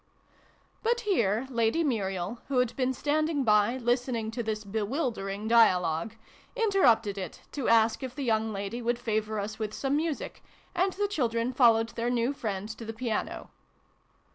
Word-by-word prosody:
But 475 +2 +1
here 235 - +1
Lady 235 +7 +1
Muriel, 195 - -2
who 275 - -1
had 250 -2 +1
been 260 -1 +1
stand 300 +4 0
ing 290 -4 0
by, 210 +2 +3
listening 240 -2 -1
to 240 +1 -3
this 215 -1 -3
bewildering 210 -1 -2
dialogue, 185 -4 +3 0.4
interrupted 245 - +3
it 185 - -7
to 280 -4 -3
ask 225 -1 +4
if 260 -1 -6
the 285 - -4
young 220 -2 +1
lady 200 +4 -4
would 240 0 0
favour 220 -2 -1
us 210 +2 -5
with 215 -1 -3
some 275 +1 0
music; 310 -1 -3 0.3
and 375 +1 +1
the 410 +1 0
children 245 - -1
followed 230 -3 +4
their 230 +1 -2
new 245 +2 +1
friend 210 -7 -4
to - - -6
the 225 0 -5
piano. 225 -1 -3
230 Hz, 165 wpm, -28 LUFS, 215-265 Hz, 0.4 s, ask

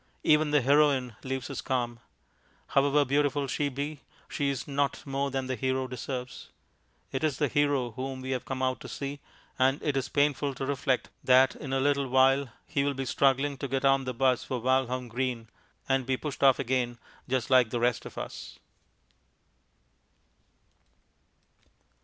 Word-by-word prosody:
Even 150 0 +4
the 145 -1 +3
Heroine 135 -3 +3
leaves 130 -1 -3
us 135 - -4
calm. 120 -2 -2 0.7
However 140 +1 +3
beautiful 145 +1 +1
she 145 +2 -1
be, 140 +2 -5 0.3
she 140 -1 -1
is 135 -3 -3
not 140 0 -1
more 140 0 -1
than 135 -1 -2
the 130 - -2
Hero 130 +2 -1
deserves. 125 0 -6 0.6
It 135 - -3
is 150 -4 +1
the 145 - +2
Hero 140 -3 +1
whom 130 +3 -5
we 130 +1 -4
have 130 -2 -2
come 130 -1 -4
out 130 0 0
to - - -9
see, 140 0 -5 0.4
and 135 +2 +3
it 145 -2 0
is 135 0 -1
painful 145 -1 +1
to 135 - -4
reflect 135 -2 -1
that 130 +1 +5
in 140 - -7
a 135 - +1
little 140 0 +1
while 130 +1 +3 0.2
he 140 - 0
will 140 0 0
he 135 0 -3
struggling 135 +2 +1
to 140 - -3
get 135 +1 -1
on 135 0 +3
the 130 - -3
'bus 130 0 +2
for 130 - -3
Walham 130 0 0
Green, 120 -1 -3 0.4
and 135 -1 +2
be 130 -1 +1
pushed 150 0 -6
off 135 -2 +6
again 125 -2 -1 0.3
just 130 0 -1
like 125 -3 +6
the 120 - -2
rest 120 0 +1
of - - -10
us. - - -7
135 Hz, 170 wpm, -28 LUFS, 130-140 Hz, 0.7 s, off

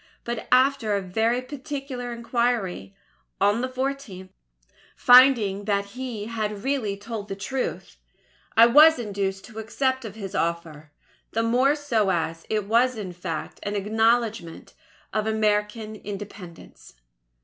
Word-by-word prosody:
But 235 -1 -5
after 255 -4 +3
a 200 - -1
very 225 +7 0
particular 270 -2 -6
inquiry, 235 - -2 0.4
on 205 +3 +2
the 255 - -2
14th, 255 -8 -4 0.7
finding 240 -6 +6
that 200 -1 0
he 245 -5 -5
had 215 -2 -4
really 255 -8 -1
told 210 0 -6
the 195 - -5
truth, 255 +7 -4 0.6
I 230 - +9
was 300 +7 +7
induced 200 -4 -3
to 220 -2 -10
accept 260 +4 -1
of 215 -3 -8
his 200 -4 -7
offer; 165 -3 -3 0.4
the 225 - +1
more 255 +5 +3
so 235 -9 0
as 165 -2 -2
it 215 -2 -1
was 235 +3 +2
in 190 -4 -6
fact 165 -2 -6
an 205 0 -3
acknowledgment 220 -3 0 0.4
of 215 0 0
American 215 0 0
Independence. 200 - -10
220 Hz, 130 wpm, -25 LUFS, 200-245 Hz, 0.7 s, I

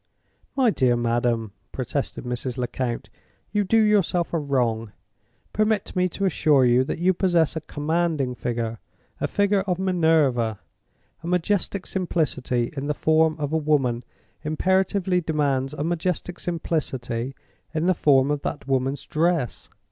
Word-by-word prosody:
"My 260 -5 +4
dear 125 -9 +2
madam," 120 -2 0 0.2
protested 135 +2 -3
Mrs. 125 +1 -4
Lecount, 125 -1 -3 0.4
"you 210 0 +2
do 215 +4 +2
yourself 200 -6 +2
a 165 - +2
wrong! 120 -7 -1 0.6
Permit 215 -2 0
me 180 0 +2
to 200 - -2
assure 150 -7 +4
you 125 +1 +4
that - - -3
you 180 +3 +3
possess 175 -4 +2
a 160 - -2
commanding 155 -3 -1
figure—a 115 -2 -5
figure 200 -1 +2
of 180 -2 +1
Minerva. 160 - +2 0.6
A 170 - -7
majestic 180 +2 0
simplicity 135 -9 -1
in 140 0 -3
the 150 - 0
form 160 +1 +3
of 150 0 -3
a - - +3
woman 135 -6 +1 0.4
imperatively 185 +3 +1
demands 140 -4 0
a 150 -1 -4
majestic 175 +1 -2
simplicity 135 -7 -3 0.4
in 160 +1 -1
the 185 - +4
form 140 -4 +4
of 145 -1 -1
that 145 - -4
woman's 135 +1 0
dress. 165 -5 0
155 Hz, 140 wpm, -24 LUFS, 125-180 Hz, 0.6 s, My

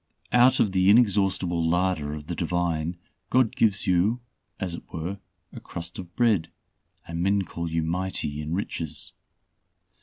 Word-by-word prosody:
Out 125 +1 +5
of 105 - +3
the 95 0 +3
inexhaustible 95 -6 +3
larder 90 -3 +1
of 75 -1 -8
the 85 - -4
Divine, 85 -1 -1 0.3
God 125 -3 +3
gives 105 -4 +2
you 95 +7 +2 0.4
as 95 -4 -3
it 85 - -9
were 90 +5 -4 0.3
a - - -7
crust 85 0 -7
of 90 -2 -9
bread, 105 -9 +2 0.6
and 85 0 -3
men 100 +2 +2
call 85 -2 -5
you 80 0 0
mighty 85 -3 -2
in 75 +3 -3
riches. 80 -7 -3
90 Hz, 150 wpm, -26 LUFS, 80-100 Hz, 0.6 s, Out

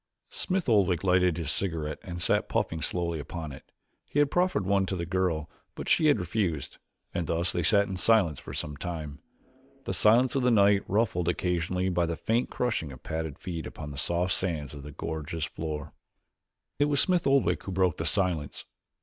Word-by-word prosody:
Smith 185 -1 -1
Oldwick 95 -7 +3
lighted 90 -2 +3
his 80 -3 0
cigarette 80 -5 -2
and 90 -2 -6
sat - - +1
puffing 80 0 -1
slowly 85 -2 -1
upon 80 +1 -6
it. 65 - -13 0.3
He - - -6
had 145 -1 +4
proffered 180 - +1
one 95 0 +2
to 95 - -2
the 85 -2 -3
girl 90 -4 0 0.3
but - - -6
she 155 - +4
had 145 -7 +4
refused, 90 - -2 0.3
and 85 -2 -2
thus 85 +3 0
they 85 - -1
sat 100 +4 +4
in 95 - -4
silence 95 -9 +3
for - - -9
some 75 -1 -4
time, 75 -4 -5 0.6
the - - -3
silence 120 +4 +4
of 135 - +1
the 125 - +3
night 100 -3 +5
ruffled 95 -5 +1
occasionally 90 +1 0
by 90 -2 +1
the 85 -1 -3
faint 115 +2 0
crunching 110 - -1
of 65 - -12
padded 80 -2 -4
feet 85 -4 -5
upon 75 -1 -8
the - - -8
soft 85 +4 +1
sands 80 -7 -2
of 70 - -8
the 75 +2 -9
gorge's 80 +1 -4
floor. 75 -2 -5 0.9
It 145 - +5
was 145 -1 +1
Smith 180 -2 +3
Oldwick 135 -2 +3
who 95 - -4
broke 95 -3 +1
the - - -3
silence. 85 -7 0
90 Hz, 190 wpm, -28 LUFS, 80-100 Hz, 0.9 s, night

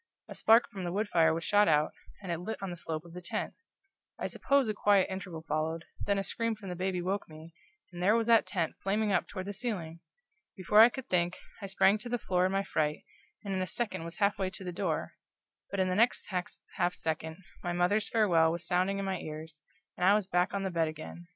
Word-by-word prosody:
A - - -8
spark 225 +2 +5
from 190 -2 -6
the 175 - -2
wood 205 +3 -1
fire 165 -3 +4
was 165 +1 -2
shot 205 +2 +4
out, 150 -1 +3 0.3
and 180 - -4
it 170 - -2
lit 220 +6 -4
on 195 -2 -4
the - - -5
slope 160 -1 -5
of 170 - -13
the 180 - -7
tent. 175 - -3 0.6
I - - -4
suppose 275 -3 +1
a 215 - 0
quiet 205 -2 +4
interval 185 -4 -6
followed, 160 +2 -1 0.2
then 200 -1 +2
a 195 - 0
scream 230 +2 -1
from 205 -3 -9
the 180 - -4
baby 185 +1 -1
awoke 185 +2 -2
me, 160 +1 -12 0.4
and 175 - -7
there 205 +5 +4
was 230 -1 +2
that 230 -1 +5
tent 170 -5 -1
flaming 205 +2 0
up 180 - +1
toward 185 -2 -6
the 200 - -4
ceiling! 190 -7 -4 0.6
Before 190 +3 +3
I 230 - +9
could 260 0 -8
think, 175 0 +1 0.2
I 200 - -4
sprang 195 +2 +3
to 240 - -6
the 245 - 0
floor 185 -4 +1
in - - -3
my 195 0 +1
fright, 150 -5 -1 0.4
and 200 -2 -3
in 190 - -1
a 185 - -1
second 225 -7 -3
was 170 0 -7
half 205 -1 +2
way 190 -1 0
to 190 - -9
the 180 - -4
door; 175 - -2 0.6
but 200 - -3
in 185 - +3
the 185 - 0
next 230 +6 +2
half 180 -1 -3
second 160 0 -3 0.2
my 175 - -2
mother's 180 +5 +1
farewell 170 -8 +4
was 170 +1 -4
sounding 185 +2 +1
in 195 - -2
my 190 -2 -2
ears, 155 0 -7 0.3
and - - -4
I 195 +3 +6
was 210 -2 +1
back 180 -1 +1
on 200 -1 -2
the 190 - -2
bed 165 -2 +1
again. 155 +2 -8
185 Hz, 240 wpm, -31 LUFS, 170-205 Hz, 0.6 s, I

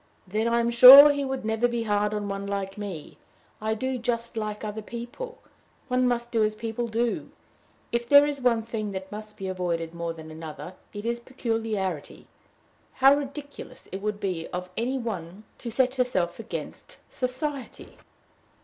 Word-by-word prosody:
"Then 215 +4 0
I 235 0 +2
am 235 0 +1
sure 265 +5 +11
he 285 0 -1
would 265 -3 -3
never 220 +2 +2
be 235 -1 -2
hard 210 -1 +1
on 210 -1 -3
one 200 0 -4
like 195 -1 -3
me. 195 -7 -7 0.4
I 220 0 0
do 260 +3 -2
just 235 -1 -2
like 215 -1 -4
other 215 0 -4
people. 240 - -7 0.5
One 250 0 +2
must 240 -1 -1
do 225 -2 +2
as 215 0 0
people 230 +2 -3
do. 230 +1 -1 0.6
If 235 0 -2
there 285 0 +8
is 290 -2 -2
one 235 -3 +2
thing 215 -3 -4
that 190 0 -6
must 210 0 -8
be 190 - -5
avoided 170 -3 -2
more 170 0 -3
than 160 -1 -11
another, 160 +2 -8 0.2
it 205 +1 -7
is 235 0 -1
peculiarity. 225 - -3 0.7
How 270 +1 +6
ridiculous 285 -2 -6
it 190 - -5
would 210 0 -2
be 180 -5 -3
of 180 0 -6
any 250 +4 -1
one 200 -5 -5 0.2
to 240 - -5
set 255 +2 +2
herself 235 -10 0
against 235 - -7
society!" 260 +1 -5
225 Hz, 170 wpm, -26 LUFS, 200-250 Hz, 0.7 s, sure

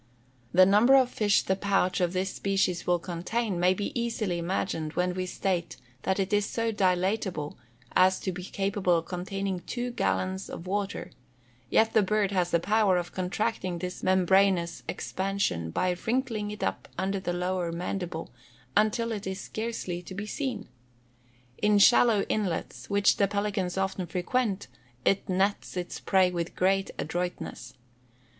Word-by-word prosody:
The 185 +1 +7
number 210 +7 +6
of 260 -2 +4
fish 205 -2 +2
the 190 - +1
pouch 195 -2 +1
of 175 -1 +2
this 190 +1 -1
species 195 -3 0
will 175 0 +4
contain 180 +4 -2
may 180 +1 +4
be 205 - -3
easily 230 -7 -1
imagined 170 -3 -2
when 180 0 0
we 185 0 -3
state 180 -2 -2 0.2
that 190 +6 0
it 195 +2 -1
is 205 -1 +2
so 230 0 -1
dilatable 185 -4 0 0.4
as 185 0 +5
to 190 - -2
be 180 0 -7
capable 195 -2 +1
of 165 - -3
containing 190 +1 -3
two 245 +6 -4
gallons 190 -4 -1
of 170 - -7
water; 200 +1 -3 0.6
yet 220 0 +3
the 220 - +5
bird 205 0 +1
has 180 -3 +1
the 170 - +3
power 205 0 +3
of 175 0 -3
contracting 185 0 -2
this 180 +1 -5
membranous 185 -2 +3
expansion, 190 - -2
by 180 - 0
wrinkling 230 -4 0
it 210 -1 -6
up - - -2
under 195 +1 -1
the 175 - -2
lower 180 -1 -1
mandible, 175 -3 -4 0.4
until 230 +2 +2
it 205 -3 -4
is 190 0 -3
scarcely 215 -6 -4
to 185 +1 -9
be 205 +2 -4
seen. 235 -2 -3 0.9
In 210 0 +4
shallow 220 0 +6
inlets, 195 -6 -3
which 200 0 +3
the 200 - +3
pelicans 200 -2 -1
often 190 -1 -1
frequent, 200 +3 -1 0.4
it 195 - +2
nets 190 +1 0
its 175 -1 -4
prey 185 -2 +3
with 170 -1 -3
great 195 +1 +2
adroitness. 175 -1 -4
190 Hz, 155 wpm, -28 LUFS, 180-205 Hz, 0.9 s, The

